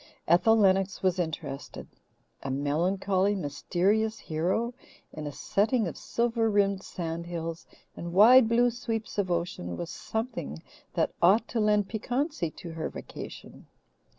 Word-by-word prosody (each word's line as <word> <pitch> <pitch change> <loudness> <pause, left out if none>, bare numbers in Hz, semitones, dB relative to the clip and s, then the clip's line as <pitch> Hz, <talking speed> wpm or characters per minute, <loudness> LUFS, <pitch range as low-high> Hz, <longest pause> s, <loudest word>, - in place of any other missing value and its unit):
Ethel 180 +7 +5
Lennox 195 -2 +2
was 185 -1 +2
interested. 155 -5 -4 0.6
A 135 - -5
melancholy, 185 +8 +1
mysterious 195 +7 0
hero 185 +10 -1 0.4
in 155 -1 -5
a - - -4
setting 215 - +1
of - - -5
silver 230 -1 0
rimmed 200 -2 +2
sand 170 -3 -5
hills 165 -1 -5 0.3
and 170 0 -6
wide 225 +6 +7
blue 240 +1 +4
sweeps 225 -3 -4
of 190 -2 0
ocean 170 - -2
was 170 - -5
something 220 - -4 0.3
that - - +1
ought 205 +7 +5
to 235 - -1
lend 210 -2 +3
piquancy 245 - -2
to 165 +2 -9
her 160 -1 -4
vacation. - - -9
190 Hz, 135 wpm, -28 LUFS, 165-220 Hz, 0.6 s, wide